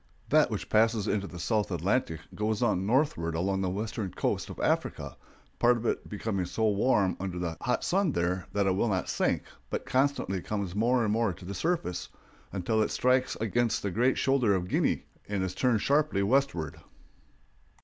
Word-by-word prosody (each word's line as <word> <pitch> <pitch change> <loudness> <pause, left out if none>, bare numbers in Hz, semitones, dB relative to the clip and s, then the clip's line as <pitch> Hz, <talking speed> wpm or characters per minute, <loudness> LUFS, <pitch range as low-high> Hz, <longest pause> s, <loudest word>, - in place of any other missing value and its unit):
That - - +5
which - - -4
passes 110 -1 +2
into 100 -1 0
the 90 - -9
South 105 +4 0
Atlantic 85 - 0
goes 105 +2 -1
on 95 -5 +1
northward 110 - +1
along 95 +3 0
the 95 - 0
western 105 +1 -3
coast - - -2
of - - -8
Africa, - - -1 0.4
part 120 0 +4
of 115 - -6
it - - -1
becoming 100 -3 -2
so 110 +4 +1
warm 100 -2 +2
under 95 -2 -4
the 85 -2 -3
hot 125 +1 0
sun 185 -4 +1
there 90 +1 -1
that 100 -1 +1
it 95 - +3
will 95 +5 +1
not 95 -3 -1
sink, - - 0 0.3
but - - -3
constantly 130 -8 0
comes 100 -2 -3
more 120 +4 +2
and 105 -1 +1
more 115 -3 +1
to 90 +1 -12
the 100 - -5
surface, 125 - -2 0.4
until 100 +4 0
it - - +1
strikes 130 +1 +2
against 115 +2 0
the 100 - -1
great 125 +7 +2
shoulder 125 -7 +3
of 90 -1 -2
Guinea - - +1 0.2
and 100 -2 -1
is 95 -1 -2
turned 120 -2 +1
sharply 145 -8 +2
westward. 115 - 0
105 Hz, 185 wpm, -29 LUFS, 95-120 Hz, 0.4 s, That